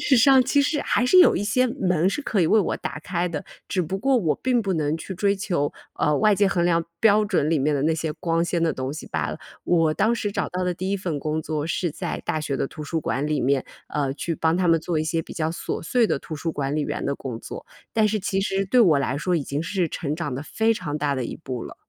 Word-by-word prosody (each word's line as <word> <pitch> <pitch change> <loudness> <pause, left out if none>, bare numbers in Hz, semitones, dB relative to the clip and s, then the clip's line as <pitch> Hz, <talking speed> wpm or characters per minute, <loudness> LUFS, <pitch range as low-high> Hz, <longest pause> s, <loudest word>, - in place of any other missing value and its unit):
实 280 -3 +3
上 265 +2 +6
其 280 +3 +2
实 290 +1 0
还 245 - +1
是 365 +9 +5
有 360 - +7
一 200 - -1
些 255 +5 +2
门 185 - +1
是 285 +9 -2
可 215 -8 0
以 165 - +3
为 220 - +4
我 195 - 0
打 - - -5
开 175 +1 -2
的， 160 -4 -5 0.2
只 185 - 0
不 190 +5 -3
过 270 +3 +2
我 165 -10 +1
并 250 -3 +1
不 195 -2 -1
能 155 -1 0
去 190 +4 -7
追 200 +2 +2
求， 175 -7 -1 0.3
呃， 150 - +2
外 215 -1 +4
界 200 0 +3
衡 175 -3 +1
量 170 -1 +2 0.2
标 215 -1 +5
准 180 -7 +1
里 160 - +3
面 145 +2 +1
的 140 - 0
那 160 +1 +2
些 160 -1 -2
光 165 0 0
鲜 170 0 -1
的 165 - +2
东 130 0 -4
西 155 - -8
罢 - - -2
了。 - - -5 0.3
我 165 -3 +3
当 220 +8 +2
时 205 -3 -2
找 - - -1
到 180 0 -2
的 180 - 0
第 185 +2 -4
1 200 - +1
份 170 -6 -3
工 155 +2 -2
作 155 0 -3
是 175 +1 -1
在 175 +3 -5
大 155 - -1
学 140 -2 -2
的 - - -1
图 150 - -9
书 160 +2 -2
馆 140 0 -1
里 150 -1 0
面， 135 0 +1 0.2
呃， 140 -2 -1
去 165 +3 -3
帮 160 +2 +1
他 180 -1 +1
们 165 -1 +4
做 165 -1 -1
一 155 - 0
些 165 +1 0
比 - - -10
较 160 -1 -1
琐 170 - -4
碎 235 +6 +2
的 - - 0
图 155 - -7
书 165 +3 -3
管 140 0 -2
理 155 - 0
员 - - -3
的 140 - 0
工 125 -4 -6
作。 - - -9 0.3
但 215 -1 +3
是 215 +1 0
其 195 0 -1
实 195 0 0
对 245 +6 +3
我 160 -10 +5
来 135 +1 -1
说 180 +2 0
已 150 - -1
经 140 +3 -3
是 180 -1 -1
成 150 -2 -3
长 170 -7 -3
得 135 - -4
非 220 +8 +1
常 155 -8 -4
大 145 -1 0
的 130 -3 -2
一 - - -5
步 130 -6 -6
了。 - - -9
170 Hz, 300 characters per minute, -24 LUFS, 150-200 Hz, 0.3 s, 有